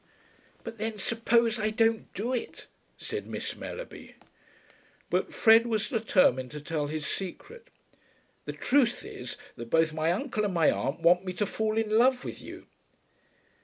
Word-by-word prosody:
"But 230 -1 -8
then 220 0 -3
suppose 230 +2 +2
I 215 0 +1
don't 225 +1 +1
do 235 +6 -2
it," 245 - -4 0.3
said - - -5
Miss - - -4
Mellerby. - - -8 1.0
But - - 0
Fred 225 +1 +5
was 220 -2 -1
determined 185 - +2
to 150 - -5
tell 150 0 -2
his 155 0 -4
secret. 405 - -6 0.8
"The - - -4
truth 250 -3 +2
is 125 0 -7 0.2
that 120 -1 -8
both 160 +1 +3
my 160 +1 +1
uncle 215 +2 -1
and 200 -3 -1
my 165 -3 +4
aunt 135 +4 -2
want 180 +2 +5
me 185 -1 -4
to 195 +4 -1
fall 220 +1 -1
in 220 0 +2
love 250 +1 +3
with - - -6
you." - - -10
215 Hz, 160 wpm, -28 LUFS, 165-230 Hz, 1.0 s, Fred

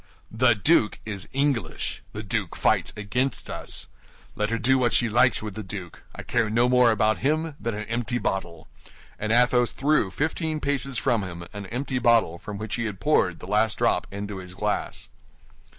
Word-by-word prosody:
"The 120 +1 +4
duke 115 0 +3
is 100 -3 -5
English; 140 -3 -1
the - - -6
duke - - -2
fights - - +2
against 125 +6 -2
us. - - -5 0.5
Let 105 0 -1
her 115 - 0
do 130 +4 +3
what 120 -2 +2
she 120 - +3
likes 120 +1 +4
with 105 -2 -5
the 110 - -5
duke; 95 -3 -8
I - - -7
care 120 -2 0
no 120 +3 +3
more 125 -1 +5
about 110 0 +2
him 155 +3 0
than 115 0 -3
an 105 0 -5
empty 120 +1 -1
bottle." 90 -7 -3 0.5
And 110 +1 -2
Athos 120 0 +3
threw 145 -7 +2
fifteen 155 - -2
paces 140 -3 0
from 115 -1 +1
him 85 -2 -6
an 100 -1 -7
empty 130 +3 -2
bottle 115 -8 +3
from 105 +2 -7
which 110 +2 -4
he 115 - -2
had 105 -4 -5
poured 95 - +2
the - - -7
last 110 +2 +1
drop - - +1
into 100 0 -5
his 90 -1 -9
glass. - - -3
115 Hz, 185 wpm, -25 LUFS, 105-125 Hz, 0.5 s, more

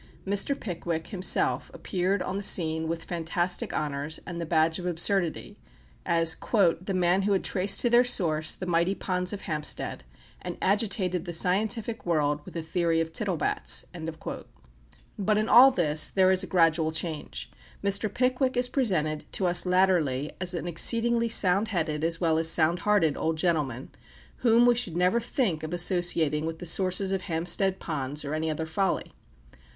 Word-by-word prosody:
Mr. 205 +8 +1
Pickwick 170 -4 -5
himself 190 -3 +1
appeared 185 +1 -1
on 185 - -4
the 200 - -3
scene 160 -4 +2
with 165 0 -4
fantastic 175 +1 -2
honours 150 +1 -3
and 170 -1 -6
the 165 - -5
badge 160 0 +1
of 180 - -5
absurdity, 175 0 0 0.5
as 165 -1 +3 0.5
"the 190 +1 -4
man 180 +1 +2
who 200 +1 +1
had 190 - 0
traced 195 +1 +3
to - - +2
their 240 +1 +5
source 160 -10 +1
the 185 - -7
mighty 175 +2 +1
ponds 180 -2 -2
of 205 - -6
Hampstead, 150 - -3 0.4
and 175 -1 -6
agitated 195 -3 0
the 175 - -5
scientific 215 +6 -1
world 150 -3 0
with - - -12
the 165 - -4
Theory 165 0 0
of 165 0 -3
Tittlebats." 185 -5 -1 1.3
But 210 +1 +1
in 215 +1 0
all 255 +3 +8
this 155 - +1
there 190 -1 +3
is 185 0 +2
a 190 - -3
gradual 165 -3 +2
change. 160 -1 -5 0.3
Mr. 200 +1 +1
Pickwick 255 +2 0
is 250 0 +1
presented 160 - -2
to 190 - 0
us 175 +1 +3
latterly 175 -7 +1
as 180 -1 -3
an 170 - -4
exceedingly 230 +7 +2
sound 200 -1 +3
headed 160 -6 -2
as 165 0 0
well 160 -2 +1
as 165 0 +3
sound 165 +1 +2
hearted 180 -6 +2
old 160 0 -2
gentleman, 150 -7 -1 0.5
whom 235 0 +4
we 245 - +5
should 230 -9 -3
never 180 +6 +2
think 230 - -2
of 160 +2 -4
associating 170 -4 +1
with 165 0 -5
the 175 - -9
sources 185 +2 +1
of 190 -1 -1
Hampstead 180 +3 -1
Ponds 145 -2 -4
or 140 - -4
any 160 +1 -2
other 155 +1 -3
folly. 190 +4 -2
175 Hz, 170 wpm, -26 LUFS, 160-195 Hz, 1.3 s, all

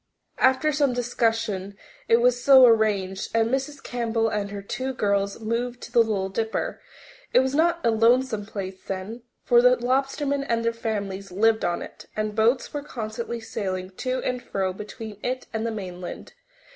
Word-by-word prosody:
After 260 +4 +4
some 285 -3 +2
discussion 225 -5 -1 0.3
it 230 - +5
was 245 0 +3
so 265 -2 +9
arranged, 210 -4 +2
and 225 0 +3
Mrs. 275 +2 -2
Campbell 230 -2 0
and 205 -1 -2
her 200 0 -6
two 260 +5 -4
girls 200 -3 0
moved 235 +2 -2
to - - -9
the 240 - +4
Little 210 -4 +2
Dipper. 220 +3 -2 0.5
It 250 - +8
was 265 0 -1
not 335 +3 +3
a 230 - +4
lonesome 230 -1 +2
place 190 -3 -6
then, 195 +5 -5 0.2
for 240 -1 +5
the 250 +1 +6
lobstermen 275 +3 0
and 230 0 +1
their 230 - +1
families 200 -4 -4
lived 220 +4 +2
on 175 0 -1
it, - - -12
and 215 0 -2
boats 235 +7 +2
were 290 - -2
constantly 235 -3 -5
sailing 185 -4 -4
to 255 0 -2
and 250 -1 -2
fro 190 -4 -2
between 210 +1 -8
it 255 +1 -3
and 220 +1 -1
the - - -2
mainland. 180 -4 -7
230 Hz, 170 wpm, -25 LUFS, 205-250 Hz, 0.5 s, so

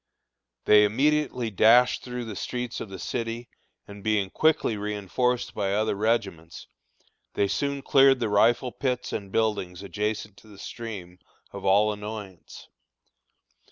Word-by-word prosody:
They 105 0 +7
immediately 130 +1 +1
dashed 120 +5 +5
through 125 -1 -5
the 110 -2 -7
streets 125 +3 -4
of 110 - -6
the 95 - -8
city, 115 +4 -4 0.4
and 100 -1 -11
being 105 -3 0
quickly 155 -7 +2
reënforced 105 +4 -2
by 100 -2 -1
other 110 +1 +1
regiments, 100 -6 -2 0.7
they 100 - +2
soon 140 +5 -2
cleared 135 -1 +5
the 115 - 0
rifle 115 +4 +3
pits 125 -1 -3
and 100 -2 -5
buildings 100 -5 -1
adjacent 105 +2 -4
to - - -18
the 105 -2 -15
stream 95 -6 -8 0.3
of - - -8
all 105 +2 +4
annoyance. 105 -3 -9
110 Hz, 135 wpm, -26 LUFS, 100-125 Hz, 0.7 s, They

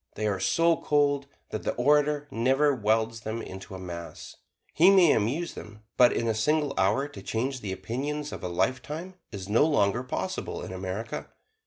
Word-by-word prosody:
They 110 - -2
are 100 -2 0
so 165 - +3
cold 145 -1 +1 0.2
that 110 - -3
the - - -2
orator 145 +3 +2
never 135 +5 +2
welds 110 -1 0
them 110 +2 -4
into 95 0 -9
a - - -7
mass. 85 -2 -8 0.4
He 175 +4 +6
may 185 -5 +6
amuse 135 +11 0
them, 105 0 -11
but 125 -1 +6
in 115 - -1
a 110 - +2
single 150 +6 +1
hour 105 +9 +2
to 100 - -10
change 125 +6 -2
the 100 - -4
opinions 145 +9 -4
of - - -7
a - - -1
lifetime 130 - -2 0.2
is 95 -2 -7
no 110 +6 +4
longer 120 -7 +2
possible 130 - -4
in - - -7
America. 95 +4 -5
120 Hz, 180 wpm, -27 LUFS, 105-145 Hz, 0.4 s, He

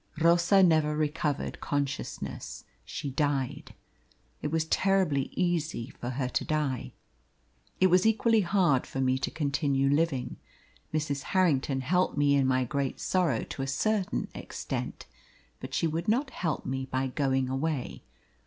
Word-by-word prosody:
Rosa 170 +4 +5
never 155 -3 +3
recovered 150 -1 -1
consciousness; 140 -1 -3 0.2
she 140 - -5
died. 140 -2 -1 0.7
It - - -1
was 160 +1 0
terribly 180 -6 +2
easy 160 -9 -1
for 120 - -6
her 130 0 -2
to 125 - -1
die. 150 -5 -2 0.9
It 185 - +5
was 185 +4 +5
equally 225 0 +3
hard 175 -8 +2
for 135 - -5
me 130 0 +2
to - - -1
continue 140 -2 0
living. 145 -4 0 0.5
Mrs. 150 -2 -1 0.2
Harrington 140 -7 +2
helped 180 +5 +1
me 145 0 +4
in 140 -2 +3
my 130 0 +2
great 140 +1 -2
sorrow 170 -11 +1
to - - -6
a 135 - -2
certain 200 +7 0
extent, - - -5 0.5
but - - -6
she - - +1
would 165 +4 -2
not 260 +6 +1
help 165 -4 -2
me 130 0 -3
by 130 0 -1
going 135 -1 0
away. 135 0 -2
145 Hz, 145 wpm, -29 LUFS, 135-170 Hz, 0.9 s, Rosa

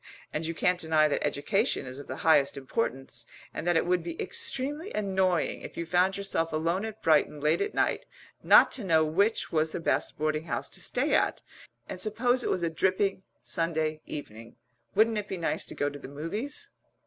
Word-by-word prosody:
And 160 +1 -2
you 165 - -3
can't 180 +2 +1
deny 160 -2 +3
that 150 - -1
education 145 - 0
is 130 +1 -8
of 145 - -10
the - - -5
highest 145 -4 +4
importance, 135 - -3 0.3
and 165 - -5
that 175 -1 +3
it - - +1
would 180 0 +1
be 165 0 -7
extremely 295 +8 -1
annoying, 190 -4 0
if - - -9
you 170 - -2
found 180 +3 +2
yourself 195 -4 -1
alone 170 +6 0
at 220 -1 -8
Brighton 150 -1 +3
late 150 - +1
at 415 +1 -2
night, - - 0 0.3
not - - +7
to 245 - -2
know 160 -4 +3
which 200 +8 +1
was 155 -1 +1
the - - -3
best 165 - -1
boarding 155 +1 -1
house - - -3
to - - -6
stay - - 0
at, - - +1 0.4
and 185 - -6
suppose 245 +4 +1
it - - -1
was 180 - 0
a 170 - +1
dripping 190 +3 +1 0.2
Sunday 155 +3 0
evening 115 -6 -8 0.4
wouldn't 220 +1 +3
it 205 - -6
be 190 - -4
nice 170 - -1
to - - -8
go 145 - 0
to 145 0 -5
the - - -9
Movies?" 165 - -6
165 Hz, 200 wpm, -28 LUFS, 155-195 Hz, 0.4 s, not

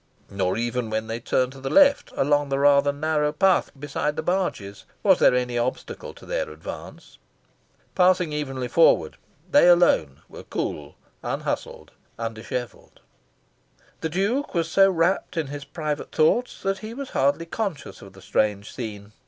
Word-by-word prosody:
Nor 95 -1 -1
even 120 0 -2
when 110 0 -2
they 115 +1 -4
turned 125 +1 0
to 135 - -12
the 135 - -3
left, 280 -1 +4
along 145 +1 +1
the 135 - 0
rather 140 0 +4
narrow 150 0 0
path 185 +4 +2
beside 145 +1 -2
the - - -3
barges, 155 - -2 0.2
was - - +5
there - - +5
any 125 -1 -1
obstacle 120 +2 -4
to - - -14
their - - -2
advance. - - -10 0.7
Passing 180 -3 +3
evenly 135 -4 -3
forward, 165 +7 +3 0.3
they 285 -10 +6
alone 130 - +3
were - - -11
cool, 75 -1 -5 0.3
unhustled, - - -4 0.3
undishevelled. 115 +1 -6 1.0
The 160 - -3
Duke 200 - -1
was 165 -1 0
so 195 +2 +6
rapt 175 0 0
in 160 - 0
his 145 -1 -7
private 150 -2 -4
thoughts 235 +11 +1
that 195 0 -1
he 215 +3 -8
was 275 0 -7
hardly 140 +5 +1
conscious 190 -3 -5
of 100 -1 -13
the 95 0 -15
strange 105 +1 -1
scene. 105 -4 -7
145 Hz, 155 wpm, -24 LUFS, 120-180 Hz, 1.0 s, they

